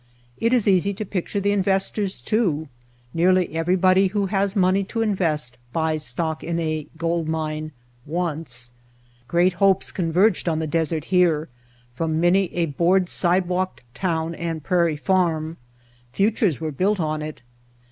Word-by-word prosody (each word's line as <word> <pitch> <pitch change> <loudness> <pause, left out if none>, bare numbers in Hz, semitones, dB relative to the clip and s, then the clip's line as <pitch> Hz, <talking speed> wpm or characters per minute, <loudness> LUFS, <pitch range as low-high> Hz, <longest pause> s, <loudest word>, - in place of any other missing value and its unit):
It 230 - +1
is 245 -5 +3
easy 195 +1 +3
to 215 - -4
picture 195 +1 -3
the 200 +1 +1
investors 195 - 0
too. 160 - 0 0.5
Nearly 180 0 +2
everybody 185 +3 +3
who 200 +1 -1
has 195 +1 0
money 190 0 +3
to 225 +3 -2
invest 155 - 0 0.2
buys 160 -2 0
stock 160 +4 -1
in 170 0 -2
a 155 -2 -2
gold 165 -1 -1
mine 155 -1 -3 0.4
once. 155 -7 -3 0.6
Great 175 +4 +3
hopes 195 -1 +3
con 170 -3 -2
verged 185 0 +3
on 160 - 0
the 160 - -1
desert 160 0 -1
here 165 -4 +3 0.4
from 160 +4 -1
many 180 +3 +4
a 170 -1 +1
board 175 +5 +2
sidewalked 180 -2 0
town 165 -1 -1
and 165 -2 -4
prairie 170 -3 +1
farm; 165 -2 0 0.5
futures 200 - +1
were 160 -1 -3
built 195 +8 0
on 155 -2 -1
it. 155 -4 -7
170 Hz, 145 wpm, -23 LUFS, 160-190 Hz, 0.6 s, many